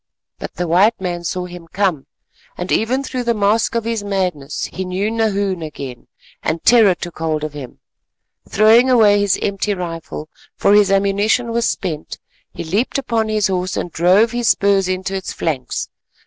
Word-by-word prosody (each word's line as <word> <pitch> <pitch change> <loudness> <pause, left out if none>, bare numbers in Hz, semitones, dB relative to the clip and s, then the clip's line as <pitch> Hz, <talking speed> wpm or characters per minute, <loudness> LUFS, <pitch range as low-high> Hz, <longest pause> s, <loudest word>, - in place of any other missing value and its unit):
But - - -7
the 175 - -2
white 195 +7 +3
man 175 -2 -4
saw 180 +1 -3
him 175 -1 -10
come, 180 -6 -1 0.5
and 180 +1 -4
even 255 +5 +1
through 255 -2 -4
the 235 -1 0
mask 210 +3 +1
of 230 - 0
his 225 -2 -2
madness 180 -8 -2
he 190 - -3
knew 190 +4 -2
Nahoon 200 -5 0
again, 140 -5 -8 0.3
and 160 +1 -2
terror 220 -6 +5
took 175 -2 -8
hold 155 -2 -1
of 155 -1 -4
him. 135 -4 -9 0.7
Throwing 225 +5 +5
away 215 -5 +5
his 200 -2 +2
empty 200 +1 -1
rifle, 165 -3 -6 0.3
for 200 - +3
his 205 -1 +5
ammunition 200 +4 +1
was 235 0 +1
spent, 160 -5 -4 0.3
he - - -6
leaped 200 - -1
upon 230 -5 -1
his 215 -1 +1
horse 185 -1 -1
and 175 - -3
drove 185 +8 +3
his 240 -1 -1
spurs 200 -1 +3
into 185 +1 -3
its 190 -1 -4
flanks. 135 -6 -3
195 Hz, 175 wpm, -18 LUFS, 175-220 Hz, 0.7 s, terror